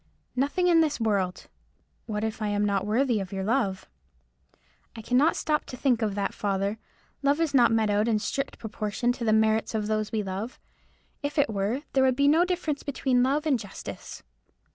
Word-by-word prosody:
"Nothing 285 +8 +1
in 335 -2 +5
this 305 -4 0
world." 200 -5 0 0.6
"What 210 -1 -2
if 220 0 -3
I 215 - 0
am 205 0 +1
not 200 -1 0
worthy 235 +1 +2
of 190 -2 -5
your 195 -1 -3
love?" 205 -4 0 1.1
"I 225 - -8
cannot 255 +8 +3
stop 300 -2 0
to 255 - -8
think 245 -3 +1
of 210 -3 0
that, 200 -1 -1
father. 200 +1 -1 0.4
Love 285 +2 +2
is 325 -3 0
not 245 -4 +5
meted 220 -2 +2
out 210 +2 +2
in 225 -2 +2
strict 275 +6 -3
proportion 220 +2 -2
to 245 -1 -5
the 220 - +2
merits 220 +1 +2
of 215 -1 -1
those 215 0 -1
we 215 -2 -1
love. 195 +5 -5 0.6
If 290 +1 -4
it 285 -4 +3
were, 210 +8 -1
there 265 - +4
would 260 -1 +3
be 280 +1 +3
no 320 +4 +5
difference 345 -5 -2
between 260 -3 0
love 280 +4 +1
and 275 -6 +2
justice." 205 -2 -8
225 Hz, 195 wpm, -27 LUFS, 210-275 Hz, 1.1 s, in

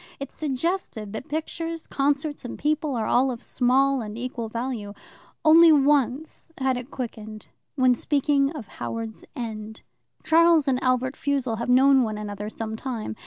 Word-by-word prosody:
It 275 - -6
suggested 275 - -3
that 220 - -7
pictures, 330 +2 -3
concerts, 285 +2 -1
and 245 - -6
people 300 -1 -1
are 225 -2 -1
all 255 +4 +3
of 245 -1 -5
small 265 +2 +2
and 210 0 -7
equal 240 -2 -4
value. 230 -3 -4 0.5
Only 325 +1 +8
once 290 +1 +1
had 265 -1 +1
it 250 +1 -6
quickened 220 -5 -7 0.3
when 255 -2 +4
speaking 280 +2 +1
of 270 -10 -8
Howards 225 +1 -6
End. 220 -2 -6 0.4
"Charles 325 -1 +4
and 260 -1 +1
Albert 255 +1 +1
Fussell 270 -5 -1
have 235 +2 -4
known 265 +2 +6
one 215 -3 -2
another 210 0 -5
some 220 0 -5
time. 225 - -5
255 Hz, 155 wpm, -25 LUFS, 225-290 Hz, 0.5 s, Only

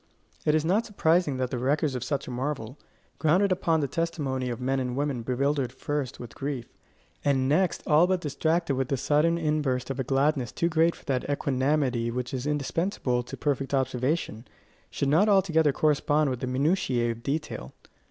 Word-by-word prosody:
It 150 - +4
is 155 0 +1
not 200 +7 +2
surprising 170 - +1
that 130 -1 -2
the 125 - -2
records 140 +3 +1
of 125 -2 -3
such 140 -2 -2
a - - -5
marvel, 130 0 -4 0.4
grounded 180 +6 +3
upon 165 -3 +1
the 140 - 0
testimony 140 -6 -2
of 120 - -4
men 135 +1 0
and 125 -1 -2
women 140 -3 -1
bewildered 130 +1 0
first 135 0 -4
with 120 -1 -9
grief, 135 -4 -4 0.6
and 135 -2 +2
next 170 +5 +1
all 155 +3 +5
but 185 -1 +1
distracted 160 +1 0
with 130 -1 -1
the 135 - 0
sudden 155 +6 +2
inburst 150 -5 0
of 135 - -5
a - - +1
gladness 135 -1 +1
too 170 - 0
great 165 +1 +3
for - - -18
that 135 0 -1
equanimity 135 -3 0
which 125 +2 -4
is 130 +1 -3
indispensable 150 -3 -1
to 120 - -8
perfect 140 -1 -1
observation, 130 -2 -1 0.4
should 140 - -2
not 165 +10 +4
altogether 165 -6 +4
correspond 150 0 +2
in 125 - -5
the 130 - -3
minutiae 130 -3 +1
of 115 0 -8
detail. 140 - -4
140 Hz, 180 wpm, -27 LUFS, 130-155 Hz, 0.6 s, all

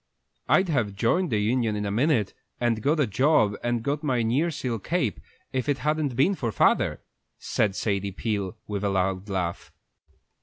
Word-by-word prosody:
"I'd 190 0 +4
have 120 - 0
joined 155 - +1
the 110 - +1
union 110 +1 +1
in 105 0 -2
a 100 - -2
minute, 120 -2 +1 0.3
and 115 -2 +1
got 150 +6 +1
a 145 - +4
job, 110 -1 +3
and 120 -1 0
got 140 +3 -1
my 130 -6 0
nearseal 125 -1 0
cape, 150 - -1 0.3
if 130 +2 -1
it 140 - +2
hadn't 150 -1 -1
been 140 +11 +3
for 120 - -2
father," - - +2 0.4
said 100 -2 0
Sadie 100 -2 -1
Peel, 100 0 -3
with 105 -1 -4
a 100 - +1
loud 95 +1 -1
laugh. 90 -3 -3
115 Hz, 175 wpm, -26 LUFS, 105-140 Hz, 0.4 s, I'd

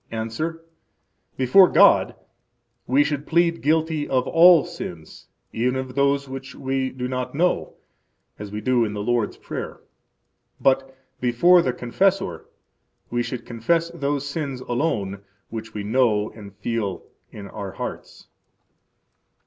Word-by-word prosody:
–Answer: 155 +9 -4 0.7
Before 155 +9 +6
God - - +5 0.7
we 135 +4 +4
should 145 -1 -3
plead 170 0 +2
guilty 155 0 0
of 130 -1 +1
all 170 0 +6
sins, 90 - -9 0.3
even 125 +3 0
of 130 -1 -4
those 140 +1 +1
which 135 +1 -8
we 135 -1 -2
do 125 -1 -5
not 125 0 -4
know, 175 +4 0 0.6
as 105 -1 -7
we 105 +1 -5
do 125 -1 +2
in 105 -2 -2
the 105 -1 -4
Lord's 120 -1 0
Prayer. - - -6 0.8
But 135 0 +1 0.2
before 170 +9 +5
the 130 - 0
confessor 125 - -1 0.6
we 120 0 0
should 120 -1 -5
confess 165 +9 0
those 145 -4 -2
sins 140 -3 -4
alone 115 -7 -2 0.3
which 115 0 -7
we 105 - -3
know 110 -2 +1
and 105 -3 -11
feel 105 -2 -3 0.3
in 100 -2 -9
our 100 -2 -7
hearts. - - -7
130 Hz, 135 wpm, -23 LUFS, 115-150 Hz, 0.8 s, Before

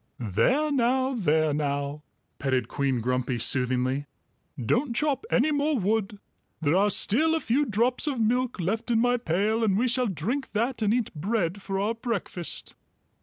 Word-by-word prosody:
"There 250 - +1
now, 260 0 +1
there 155 - +1
now," 145 0 -2 0.4
petted 130 -4 0
Queen 135 -2 -1
Grumpy 125 +1 -1
soothingly. 130 +3 0 0.5
"Don't 235 - 0
chop 300 - 0
any 280 +5 +2
more 290 0 +1
wood. 210 0 0 0.4
There 155 +1 +1
are 200 +2 +4
still 305 +11 +3
a - - +1
few 285 +2 +1
drops 235 +6 +1
of 275 -5 -1
milk 245 +1 0
left 220 +7 -2
in 230 -2 +3
my 245 +1 +3
pail, 215 +3 0
and 200 -3 +2
we 245 +4 +2
shall 250 0 +1
drink 225 - -3
that 235 +3 -1
and 210 -1 +2
eat 240 -1 0
bread 185 +2 -1
for 195 0 -3
our 210 +3 0
breakfast." 225 -7 -4
215 Hz, 165 wpm, -26 LUFS, 150-245 Hz, 0.5 s, are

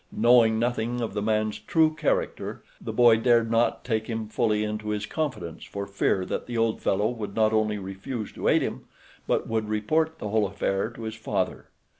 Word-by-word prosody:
Knowing 115 -1 +5
nothing 120 +1 -1
of 115 -4 -3
the 105 - -2
man's 110 0 0
true 155 +8 +2
character 155 - -2 0.2
the - - -3
boy 120 0 +6
dared 115 -1 +3
not 115 +1 +2
take 110 -3 -1
him 110 -2 -3
fully 110 -2 +1
into 105 0 -3
his 105 -1 -2
confidence 130 - -4
for 100 0 -5
fear 100 -1 0
that - - -4
the 120 -1 -3
old 115 -1 +1
fellow 105 +2 +1
would 105 -4 -6
not 110 -1 +3
only 110 -1 +1
refuse 100 +4 -5
to - - -4
aid - - +4
him, - - -4 0.4
but - - 0
would 110 -1 -1
report 155 +10 0
the 105 - -5
whole 105 -1 +2
affair 95 +1 -1
to 120 -1 -10
his 110 0 -4
father. 110 - -2
110 Hz, 195 wpm, -26 LUFS, 105-120 Hz, 0.4 s, boy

